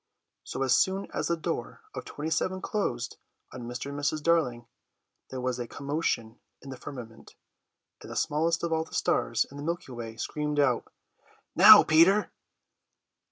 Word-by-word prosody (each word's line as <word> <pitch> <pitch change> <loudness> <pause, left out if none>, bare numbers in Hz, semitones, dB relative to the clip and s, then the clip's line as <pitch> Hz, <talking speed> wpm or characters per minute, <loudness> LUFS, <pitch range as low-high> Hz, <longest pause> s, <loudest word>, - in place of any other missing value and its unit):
So 135 - -4
as 130 - +3
soon 190 +1 +1
as - - -1
the 170 - 0
door 165 - -4
of - - -6
27 160 +5 -2
closed 120 - -2 0.4
on 120 -2 -7
Mr. 125 +3 -5
and 140 - -5
Mrs. 145 +1 -1
Darling 140 -8 +1 0.6
there 130 - -5
was 125 0 -2
a 120 - -4
commotion 140 -6 -3 0.2
in 135 - -10
the - - -6
firmament, 125 -4 -10 0.7
and - - -11
the - - -7
smallest 165 +3 0
of 170 -1 0
all 160 0 +1
the 160 - -11
stars - - +1
in 140 - -10
the 145 - -6
Milky 170 -3 -4
Way 115 -2 -7
screamed 150 +2 -2
out: 130 -4 +1 0.6
"Now, - - +10
Peter!" 175 +7 +4
145 Hz, 160 wpm, -28 LUFS, 125-165 Hz, 0.7 s, Now